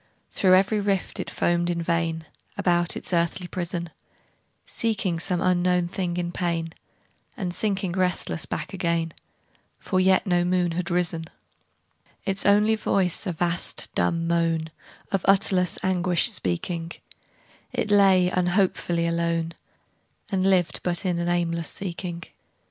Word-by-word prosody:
Through 185 Hz, -1 st, +4 dB
every 195 Hz, +3 st, +3 dB
rift 200 Hz, -2 st, -1 dB
it -, -, -3 dB
foamed 175 Hz, 0 st, 0 dB
in 170 Hz, -1 st, -1 dB
vain, 165 Hz, -1 st, -1 dB, 0.3 s
About 175 Hz, -3 st, +1 dB
its -, -, -6 dB
earthly 170 Hz, +1 st, 0 dB
prison, 175 Hz, -2 st, -3 dB, 0.7 s
Seeking 200 Hz, -7 st, -1 dB
some 175 Hz, 0 st, 0 dB
unknown 180 Hz, -1 st, +2 dB
thing 175 Hz, -1 st, -3 dB
in 175 Hz, -1 st, -2 dB
pain, 165 Hz, -2 st, -2 dB, 0.6 s
And 180 Hz, -6 st, -3 dB
sinking 195 Hz, -2 st, -1 dB
restless 180 Hz, -2 st, -1 dB
back -, -, -4 dB
again, 170 Hz, -3 st, -1 dB, 0.6 s
For 185 Hz, -, -1 dB
yet 190 Hz, +2 st, +4 dB
no 175 Hz, -2 st, +2 dB
moon 180 Hz, -1 st, +1 dB
had 175 Hz, +1 st, -2 dB
risen: 170 Hz, -2 st, 0 dB, 1.0 s
Its 195 Hz, +1 st, 0 dB
only 210 Hz, +2 st, +5 dB
voice 195 Hz, -3 st, +1 dB
a -, -, 0 dB
vast 175 Hz, +1 st, -1 dB
dumb 165 Hz, -1 st, 0 dB
moan, 165 Hz, -1 st, 0 dB, 0.4 s
Of 195 Hz, -2 st, 0 dB
utterless 190 Hz, -2 st, +3 dB
anguish 180 Hz, -2 st, +2 dB
speaking, 165 Hz, -, -2 dB, 0.8 s
It 210 Hz, -, -2 dB
lay 190 Hz, -3 st, +5 dB
unhopefully 180 Hz, -2 st, +1 dB
alone, 170 Hz, 0 st, -1 dB, 0.8 s
And 190 Hz, -2 st, +1 dB
lived 175 Hz, -5 st, +2 dB
but 175 Hz, +1 st, -2 dB
in 175 Hz, -2 st, 0 dB
an 170 Hz, 0 st, -1 dB
aimless 170 Hz, -1 st, 0 dB
seeking. 175 Hz, -2 st, -5 dB
175 Hz, 130 wpm, -25 LUFS, 170-185 Hz, 1.0 s, only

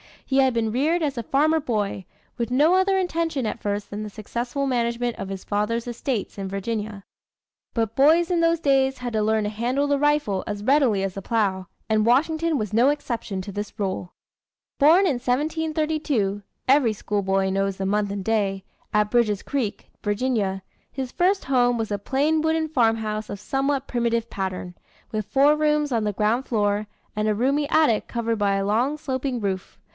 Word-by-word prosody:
He 265 Hz, -, 0 dB
had 265 Hz, -2 st, +4 dB
been 225 Hz, -2 st, 0 dB
reared 310 Hz, +8 st, +1 dB
as 280 Hz, -4 st, -1 dB
a -, -, -1 dB
farmer 310 Hz, +6 st, +2 dB
boy, 210 Hz, -8 st, -2 dB, 0.3 s
with 235 Hz, -2 st, -2 dB
no 295 Hz, +7 st, +4 dB
other 385 Hz, +1 st, +3 dB
intention 330 Hz, -7 st, -1 dB
at 220 Hz, -, -3 dB
first 205 Hz, 0 st, -2 dB
than 205 Hz, +1 st, -5 dB
the 215 Hz, -, -5 dB
successful 240 Hz, +6 st, -3 dB
management 240 Hz, -2 st, -1 dB
of -, -, -5 dB
his 195 Hz, -1 st, -6 dB
father's 210 Hz, +3 st, -1 dB
estates 240 Hz, -3 st, -3 dB
in 195 Hz, -1 st, -4 dB
Virginia. 205 Hz, +1 st, -4 dB, 0.7 s
But 225 Hz, -2 st, -1 dB
boys 325 Hz, +6 st, +5 dB
in 345 Hz, -, +2 dB
those 335 Hz, 0 st, +2 dB
days 270 Hz, -2 st, +2 dB
had 245 Hz, -2 st, -4 dB
to 215 Hz, -, +1 dB
learn 220 Hz, 0 st, +2 dB
to 210 Hz, -, -1 dB
handle 245 Hz, +6 st, 0 dB
the 285 Hz, -1 st, +1 dB
rifle 295 Hz, -10 st, +1 dB
as 205 Hz, -1 st, -4 dB
readily 255 Hz, -6 st, +3 dB
as 195 Hz, -1 st, -2 dB
the 195 Hz, -, -5 dB
plow, 195 Hz, -4 st, 0 dB, 0.2 s
and 215 Hz, -1 st, +2 dB
Washington 315 Hz, +6 st, +2 dB
was 215 Hz, -4 st, -3 dB
no 240 Hz, +5 st, +5 dB
exception 235 Hz, -9 st, -3 dB
to 200 Hz, -, -7 dB
this 205 Hz, +1 st, -6 dB
rule. 190 Hz, -3 st, -3 dB, 0.7 s
Born 315 Hz, +6 st, +6 dB
in 310 Hz, -8 st, +2 dB
1732 300 Hz, -5 st, -1 dB, 0.3 s
(every 260 Hz, -4 st, +4 dB
schoolboy 195 Hz, -2 st, 0 dB
knows 195 Hz, 0 st, 0 dB
the 190 Hz, -, -3 dB
month 205 Hz, +1 st, +1 dB
and 200 Hz, -1 st, -4 dB
day) 195 Hz, -3 st, 0 dB, 0.3 s
at 210 Hz, 0 st, +2 dB
Bridges 215 Hz, -5 st, +2 dB
Creek, 255 Hz, -8 st, -3 dB
Virginia, 205 Hz, -3 st, -1 dB, 0.3 s
his 260 Hz, -2 st, -4 dB
first 380 Hz, +2 st, +1 dB
home 245 Hz, -2 st, +2 dB
was 220 Hz, -2 st, -3 dB
a 205 Hz, -, -1 dB
plain 295 Hz, +8 st, +1 dB
wooden 320 Hz, 0 st, 0 dB
farmhouse 225 Hz, -5 st, 0 dB
of 200 Hz, -, -5 dB
somewhat 275 Hz, +3 st, -1 dB
primitive 235 Hz, -1 st, 0 dB
pattern, 185 Hz, -2 st, -4 dB, 0.4 s
with 215 Hz, -2 st, -2 dB
four 275 Hz, +7 st, +4 dB
rooms 300 Hz, -1 st, +1 dB
on 225 Hz, -3 st, +1 dB
the 210 Hz, -, 0 dB
ground 220 Hz, +6 st, 0 dB
floor, 210 Hz, -2 st, 0 dB, 0.3 s
and 215 Hz, 0 st, +1 dB
a 215 Hz, -, +2 dB
roomy 280 Hz, +6 st, +1 dB
attic 305 Hz, -10 st, +3 dB
covered 230 Hz, -1 st, -1 dB
by 200 Hz, -1 st, +2 dB
a 195 Hz, 0 st, 0 dB
long, 240 Hz, +9 st, +1 dB
sloping 265 Hz, -4 st, -2 dB
roof. 190 Hz, -2 st, -3 dB
235 Hz, 185 wpm, -24 LUFS, 205-280 Hz, 0.7 s, Born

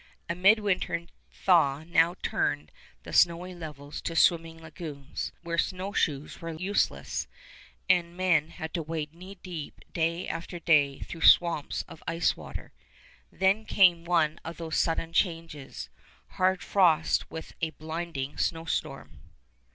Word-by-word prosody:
A 170 Hz, -, -1 dB
midwinter 195 Hz, -2 st, +2 dB, 0.3 s
thaw 155 Hz, -6 st, +3 dB
now 170 Hz, +1 st, +3 dB
turned 75 Hz, +1 st, -1 dB, 0.3 s
the -, -, -9 dB
snowy 175 Hz, +2 st, +3 dB
levels 150 Hz, -4 st, -8 dB
to 165 Hz, -, -4 dB
swimming 165 Hz, -1 st, +3 dB
lagoons, 155 Hz, -3 st, -6 dB
where 170 Hz, 0 st, -1 dB
snowshoes 185 Hz, -7 st, -1 dB
were 165 Hz, -1 st, -5 dB
useless, 190 Hz, +5 st, -1 dB, 0.6 s
and 175 Hz, -2 st, +4 dB
the -, -, -18 dB
men 170 Hz, -4 st, +2 dB
had 160 Hz, -1 st, -7 dB
to 170 Hz, -, -1 dB
wade 155 Hz, -1 st, -4 dB
knee 185 Hz, +4 st, -11 dB
deep 170 Hz, -5 st, -7 dB
day 170 Hz, +2 st, 0 dB
after 170 Hz, +2 st, -5 dB
day 150 Hz, -5 st, +3 dB
through 165 Hz, -, -7 dB
swamps 170 Hz, -4 st, +4 dB
of 160 Hz, -, -13 dB
ice 165 Hz, 0 st, +1 dB
water. -, -, -9 dB, 0.6 s
Then 190 Hz, +4 st, +2 dB
came 180 Hz, -6 st, +4 dB
one 165 Hz, -2 st, +1 dB
of 165 Hz, +1 st, -7 dB
those 165 Hz, -1 st, -2 dB
sudden 165 Hz, 0 st, 0 dB
changes, 165 Hz, -7 st, -2 dB, 0.4 s
hard 185 Hz, 0 st, +1 dB
frost 170 Hz, -5 st, +3 dB
with 160 Hz, -, -8 dB
a 160 Hz, -, +1 dB
blinding 155 Hz, -2 st, -5 dB
snowstorm. 150 Hz, -, -2 dB
165 Hz, 135 wpm, -28 LUFS, 155-175 Hz, 0.6 s, and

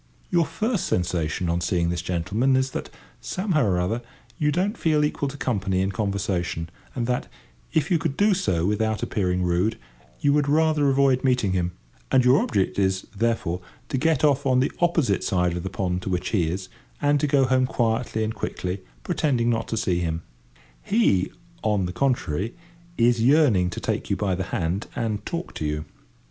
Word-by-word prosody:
Your 170 Hz, -4 st, +3 dB
first 220 Hz, -4 st, -1 dB
sensation 90 Hz, -1 st, -1 dB
on 85 Hz, +1 st, 0 dB
seeing 85 Hz, -1 st, +1 dB
this 85 Hz, -1 st, -2 dB
gentleman 95 Hz, +9 st, +1 dB
is 130 Hz, 0 st, +1 dB
that, -, -, -5 dB, 0.3 s
somehow 185 Hz, -6 st, 0 dB
or 90 Hz, -3 st, +1 dB
other, 110 Hz, +7 st, -1 dB, 0.4 s
you 150 Hz, -2 st, +2 dB
don't 190 Hz, +8 st, 0 dB
feel 155 Hz, -7 st, +2 dB
equal 145 Hz, -1 st, -1 dB
to 145 Hz, -, -8 dB
company 95 Hz, -8 st, 0 dB
and 95 Hz, +1 st, -1 dB
conversation, 90 Hz, -4 st, -2 dB, 0.2 s
and 120 Hz, -3 st, -1 dB
that, 125 Hz, +1 st, -1 dB, 0.4 s
if 160 Hz, +4 st, +1 dB
you 170 Hz, -, +4 dB
could 140 Hz, -2 st, -2 dB
do 205 Hz, 0 st, +4 dB
so 130 Hz, -, 0 dB
without 110 Hz, +2 st, 0 dB
appearing 90 Hz, -3 st, 0 dB
rude, 90 Hz, +6 st, +1 dB, 0.4 s
you 145 Hz, -, +3 dB
would 145 Hz, -1 st, +2 dB
rather 155 Hz, -1 st, +3 dB
avoid 135 Hz, -1 st, +3 dB
meeting 125 Hz, -7 st, +2 dB
him; 90 Hz, -1 st, 0 dB, 0.4 s
and 130 Hz, -1 st, +4 dB
your 125 Hz, +3 st, +6 dB
object 100 Hz, -1 st, 0 dB
is, 95 Hz, -1 st, +1 dB
therefore, 105 Hz, -6 st, 0 dB, 0.3 s
to -, -, -1 dB
get 160 Hz, -1 st, +2 dB
off 145 Hz, -2 st, +3 dB
on 130 Hz, -2 st, +3 dB
the 130 Hz, -, +1 dB
opposite 165 Hz, -, +2 dB
side 90 Hz, -2 st, +1 dB
of 90 Hz, -, -3 dB
the 95 Hz, -, -4 dB
pond 90 Hz, -2 st, -2 dB
to 95 Hz, -, -4 dB
which 90 Hz, 0 st, -1 dB
he 90 Hz, -7 st, +1 dB
is, 95 Hz, +2 st, -4 dB, 0.3 s
and 145 Hz, 0 st, +3 dB
to 150 Hz, -, +1 dB
go 140 Hz, -1 st, +4 dB
home 130 Hz, 0 st, +2 dB
quietly 115 Hz, -2 st, 0 dB
and 110 Hz, 0 st, -2 dB
quickly, 90 Hz, -2 st, -4 dB, 0.2 s
pretending 120 Hz, -6 st, +1 dB
not 115 Hz, -1 st, -1 dB
to 115 Hz, -, -2 dB
see 90 Hz, -5 st, +1 dB
him. 85 Hz, -1 st, -2 dB, 0.6 s
He, 100 Hz, -, +2 dB, 0.3 s
on 105 Hz, -3 st, +1 dB
the 90 Hz, -, -4 dB
contrary 115 Hz, -, 0 dB, 0.4 s
is 120 Hz, 0 st, +3 dB
yearning 120 Hz, -, +4 dB
to 90 Hz, -, -5 dB
take -, -, -2 dB
you -, -, +2 dB
by 100 Hz, -3 st, 0 dB
the 95 Hz, +1 st, -2 dB
hand, 90 Hz, +5 st, -2 dB
and 110 Hz, -3 st, -2 dB
talk 170 Hz, +1 st, -4 dB
to 75 Hz, -, -4 dB
you. 75 Hz, +1 st, -2 dB
110 Hz, 190 wpm, -24 LUFS, 90-140 Hz, 0.6 s, your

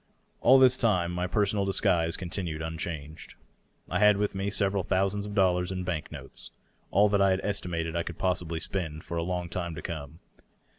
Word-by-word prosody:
All 130 Hz, +3 st, +7 dB
this 130 Hz, -1 st, +6 dB
time 90 Hz, -8 st, +1 dB
my 90 Hz, +1 st, -2 dB
per 105 Hz, +3 st, +2 dB
sonal 100 Hz, 0 st, 0 dB
disguise 85 Hz, -3 st, +1 dB
continued 85 Hz, -3 st, -4 dB
unchanged. 80 Hz, -1 st, -6 dB, 0.5 s
I 90 Hz, -, -1 dB
had 105 Hz, -1 st, +6 dB
with 105 Hz, 0 st, 0 dB
me 100 Hz, +1 st, -2 dB
several 100 Hz, -1 st, +1 dB
thousands 100 Hz, +3 st, 0 dB
of 105 Hz, -, -7 dB
dollars 90 Hz, -2 st, +2 dB
in 90 Hz, -1 st, -3 dB
bank 85 Hz, -4 st, -3 dB
notes -, -, -9 dB, 0.2 s
— -, -, -39 dB
all 100 Hz, +3 st, +4 dB
that 100 Hz, -1 st, +2 dB
I 100 Hz, -, +5 dB
had 95 Hz, 0 st, +1 dB
estimated 85 Hz, -5 st, -2 dB
I 85 Hz, -, +1 dB
could 85 Hz, -1 st, -6 dB
possibly 85 Hz, -3 st, -1 dB
spend 80 Hz, -4 st, -3 dB
for 85 Hz, -, -5 dB
a 85 Hz, -, 0 dB
long 90 Hz, 0 st, -2 dB
time 85 Hz, -1 st, -4 dB
to -, -, -6 dB
come. 80 Hz, -3 st, -6 dB
90 Hz, 200 wpm, -28 LUFS, 85-100 Hz, 0.5 s, All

